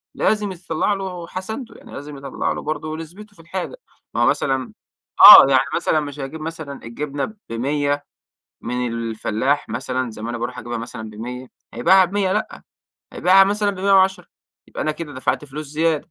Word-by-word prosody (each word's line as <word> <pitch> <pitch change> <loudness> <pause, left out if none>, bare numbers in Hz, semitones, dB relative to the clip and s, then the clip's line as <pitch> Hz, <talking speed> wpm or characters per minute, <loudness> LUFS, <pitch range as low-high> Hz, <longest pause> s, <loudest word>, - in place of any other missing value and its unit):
لازم 210 -2 +1
يطلع 170 +2 -1
له 185 -3 -5
حسنته، 220 +8 -6
يعني - - -15
لازم 145 0 -8
يطلع 135 0 -3
له - - -4
برضو 155 +1 -4
نسبته 180 +7 -10
في 165 - -16
الحاجة. 180 - -5 0.4
ما - - 0
هو - - +5
مثلًا 130 -2 0 0.5
آه - - +13
يعني 130 -1 +4
مثلًا 155 - +1
مش 145 -1 -6
هيجيب 140 +3 -6
مثلًا 155 -3 -7
الجبنة 140 - -4 0.2
ب100 145 +4 -1 0.6
من 125 +1 -3
الفلاح 115 +3 -1
مثلًا 130 -1 -3
زي 110 -1 -10
ما 115 - -4
أنا 120 - -4
باروح 120 +2 -5
أجيبها 120 0 -5
مثلًا 115 -1 -7
ب100، 125 +4 -7 0.3
هيبيعها 185 +11 +5
ب100، 190 +1 0
لأ، 210 +2 -3 0.5
هيبيعها 190 +2 +5
مثلًا 205 +1 0
ب110 195 0 +2 0.4
يبقى - - -5
أنا 155 - 0
كده 150 -1 -8
دفعت 130 +3 -1
فلوس 150 +2 -7
زيادة. 155 +2 -1
150 Hz, 170 wpm, -21 LUFS, 130-185 Hz, 0.6 s, آه